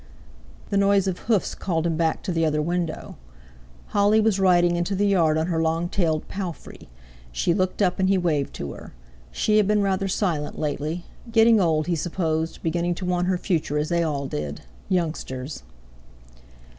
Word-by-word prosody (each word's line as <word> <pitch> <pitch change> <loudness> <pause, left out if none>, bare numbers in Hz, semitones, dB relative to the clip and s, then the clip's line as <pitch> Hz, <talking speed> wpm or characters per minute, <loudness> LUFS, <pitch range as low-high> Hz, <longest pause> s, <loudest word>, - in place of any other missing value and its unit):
The 200 - +2
noise 200 -1 +3
of 185 -2 -2
hoofs 215 -5 +2
called 165 -3 -2
him 165 -1 0
back 160 0 0
to 190 - -2
the 165 -1 0
other 150 -1 +1
window. 170 +1 -3 0.7
Holly 205 +1 +3
was 215 -3 +2
riding 175 -2 +4
into 175 +3 -1
the 205 +2 +1
yard 170 -6 +3
on 160 - +1
her 165 -2 0
long 165 +2 0
tailed 160 -5 0
"palfrey." 185 - -7 0.4
She 60 - +1
looked 185 +2 0
up 180 -1 +1
and 190 0 +2
he 195 - +4
waved 155 -6 0
to 70 - -5
her. - - -12 0.4
She 215 - +1
had 210 -2 +4
been 210 -1 +2
rather 195 0 0
silent 175 -6 -1
lately; 155 +3 -3 0.3
getting 225 -1 +5
old, 160 -3 +2
he 175 - 0
supposed, 160 -1 -2
beginning 170 +1 0
to 185 - -5
want 180 0 0
her 185 -1 +1
future, 165 -5 -1
as 150 +1 -1
they 170 -1 +1
all 145 -4 -1
did—youngsters! 130 - -4
175 Hz, 175 wpm, -24 LUFS, 155-190 Hz, 0.7 s, getting